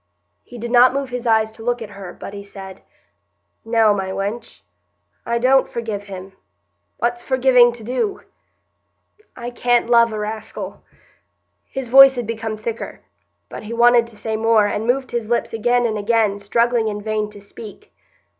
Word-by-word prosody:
He 245 - -12
did 235 +1 -5
not 250 +2 +6
move 275 -2 -3
his 250 -1 -4
eyes 220 -1 +3
to 225 0 -13
look 245 +1 0
at 220 -3 -8
her, 195 -3 -9
but - - -10
he 200 - -7
said,— 195 -1 -11 0.8
"No, 225 -2 +3
my 190 -2 -3
wench. 195 - -5 0.6
I 235 0 +1
don't 260 +2 +3
forgive 220 -4 -5
him. 190 -1 -9 0.6
What's 240 +1 -1
forgiving 255 -2 +4
to 235 -2 -12
do? 260 - -2 1.1
I 240 0 -6
can't 240 -1 +1
love 235 -1 +5
a 215 - -4
raskill——" 215 +1 -6 0.9
His 270 -2 -5
voice 270 +2 +8
had 245 -1 -3
become 225 -1 -4
thicker; 225 +1 -6 0.5
but - - -8
he 220 +2 -7
wanted 235 0 +4
to 230 -2 -15
say 220 +1 -3
more, 220 -1 +3
and 210 +2 -2
moved 260 +2 0
his 235 -2 -3
lips 240 -1 -1
again 240 +2 +1
and 220 -2 -1
again, 210 -1 +1
struggling 235 +2 +1
in 205 -1 -4
vain 215 -1 -2
to 210 -1 -12
speak. 215 - -12
230 Hz, 170 wpm, -20 LUFS, 210-240 Hz, 1.1 s, voice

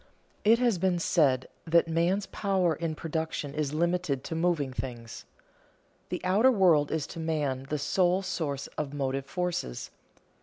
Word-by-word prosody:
_ - - -28 0.4
It 225 +2 +6
has 235 -6 +2
been 185 0 +2
said 140 -6 +2 0.2
that 170 +1 +4
man's 170 +5 +1
power 190 -4 0
in 160 +1 -3
production 160 -2 -3
is 150 -2 -1
limited 170 -5 0
to - - -5
moving 165 -5 0
things. 120 -3 -6 0.8
The - - -2
outer 205 +8 +5
world 175 - +4
is 155 -2 -1
to 165 - -9
man 145 -5 -2
the 150 - 0
sole 180 +5 +2
source 150 -7 -3
of 145 -1 -3
motive 135 -1 -2
forces. 175 - -3
160 Hz, 155 wpm, -28 LUFS, 140-180 Hz, 0.8 s, It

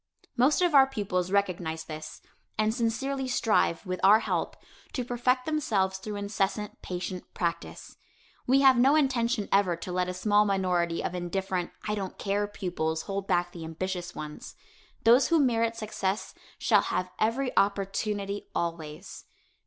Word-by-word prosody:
Most 270 +8 +3
of 350 -3 +2
our 270 -1 +7
pupils 195 -8 -2
recognize 175 -5 0
this 155 0 -8 0.3
and 215 0 +2
sincerely 260 +3 -1
strive, 220 -7 +1
with 185 -1 -3
our 210 +3 +7
help, - - -2 0.4
to 250 - -2
perfect 250 +1 +1
themselves 205 -12 0
through 210 +2 -6
incessant 205 0 -2
patient 180 0 -5
practice. 170 -1 -4 0.5
We 270 +2 +5
have 265 -3 +6
no 270 +4 +5
intention 245 -7 +1
ever 195 -3 +3
to 170 +2 -7
let 180 0 0
a 180 - -4
small 205 +2 +3
minority 180 -4 0
of - - -2
indifferent, 180 0 -2 0.2
"I 210 - 0
don't 195 -3 -4
care" 205 +1 -1
pupils, 175 -6 -3
hold 200 -1 -4
back 175 0 +1
the 170 -2 -8
ambitious 175 +2 -4
ones. 150 0 -8 0.5
Those 240 +4 +6
who 335 -1 +3
merit 230 -4 +2
success 215 -2 -3 0.2
shall - - +4
have 180 0 -2
every 250 +4 0
opportunity 200 0 0
always. 165 -3 -4
200 Hz, 150 wpm, -28 LUFS, 180-235 Hz, 0.5 s, our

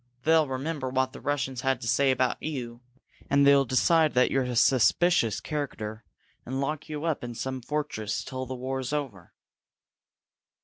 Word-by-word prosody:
They'll 160 0 +4
remember 135 +1 -3
what 130 0 0
the - - -10
Russians 135 -3 -2
had 135 -1 0
to 115 - -5
say 135 +3 +3
about 130 -1 +1
you, 125 -6 -5 0.5
and 140 0 +4
they'll 140 -1 +6
decide 155 +5 +3
that 125 - +4
you're 135 - +2
a 125 -1 -3
suspicious 130 - +3
character, 115 -8 -5 0.4
and 130 +2 -4
lock 150 +2 -3
you 150 -1 -5
up 160 -6 -1
in 120 -1 -6
some 130 +2 -4
fortress 130 -5 -3
till 130 -1 -5
the 130 - -5
war's 130 +1 -4
over!" 130 - -4
130 Hz, 165 wpm, -27 LUFS, 125-145 Hz, 0.5 s, they'll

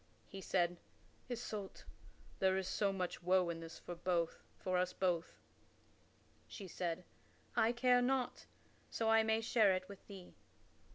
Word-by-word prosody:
He 195 - -8
said, 175 -2 +1 0.5
"Isoult, 220 -5 -5 0.6
there 190 0 +3
is 190 +2 -2
much 195 -3 0
woe 180 0 +3
in 165 - -5
this 165 0 -8
for 175 +1 -2
us 180 0 0
both." 175 -3 0 1.1
She 195 - -8
said, 175 0 -3 0.5
"I 225 - +4
care 245 +1 +4
not, 255 0 0 0.4
so 225 -1 +1
I 225 0 +7
may 220 0 +2
share 220 -3 +4
it 185 0 -4
with 200 -1 -12
thee." 190 -3 -10
190 Hz, 130 wpm, -37 LUFS, 180-220 Hz, 1.1 s, I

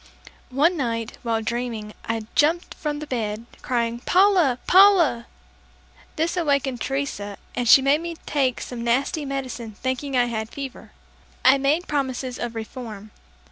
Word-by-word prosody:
One 300 +7 +2
night, 230 -4 -3
while 225 -2 -1
dreaming, 230 -2 -3
I 225 -1 -3
jumped 325 +4 +2
from 300 -2 -3
the 300 - -6
bed, 225 -4 -3 0.2
crying, 235 -1 -1
"Paula! 360 -4 +4
Paula!" 360 -11 +5 0.9
This 330 +3 0
awakened 280 -7 0
Teresa, 270 -8 -3 0.2
and 245 -2 -1
she 265 - +8
made 285 +3 +3
me 340 0 -5
take 265 -4 0
some 240 -2 -6
nasty 265 +5 0
medicine 260 -5 -5
thinking 260 +4 -2
I 245 - +4
had 220 -2 -3
fever. 270 -1 -8 0.5
I 265 +2 +7
made 295 +6 +1
promises 260 -3 -2
of 235 -1 -4
reform. 220 -2 -7
260 Hz, 140 wpm, -23 LUFS, 235-290 Hz, 0.9 s, she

